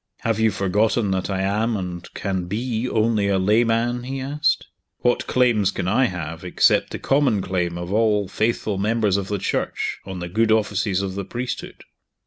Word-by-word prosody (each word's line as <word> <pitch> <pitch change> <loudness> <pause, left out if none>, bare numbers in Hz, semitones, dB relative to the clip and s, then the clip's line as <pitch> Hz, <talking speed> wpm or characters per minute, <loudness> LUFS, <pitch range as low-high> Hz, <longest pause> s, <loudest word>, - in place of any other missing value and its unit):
"Have 115 -1 0
you 110 0 +4
forgotten 105 +2 +1
that 95 0 -1
I 95 -1 -1
am, 105 +4 0
and 90 -2 -6
can 95 -2 -2
be, 115 +5 -2
only 110 -2 +1
a 100 -1 +2
layman?" 115 +4 +2
he 135 +2 -5
asked. 145 +3 0 0.4
"What 120 - +1
claims 120 -6 +3
can 90 - -3
I 130 +8 +3
have, 85 -5 -5
except 90 - +3
the - - -5
common 135 -6 +2
claim 90 -2 -1
of 85 +2 -4
all 105 -2 +2
faithful 110 -1 -1
members 105 -1 +1
of 100 -1 -1
the 105 - -1
Church - - -2
on 95 -1 -7
the 85 0 -5
good 110 +5 +1
offices 105 -3 +1
of 95 -1 -3
the 100 +1 -4
priesthood?" 120 +5 -5
105 Hz, 180 wpm, -22 LUFS, 95-115 Hz, 0.4 s, you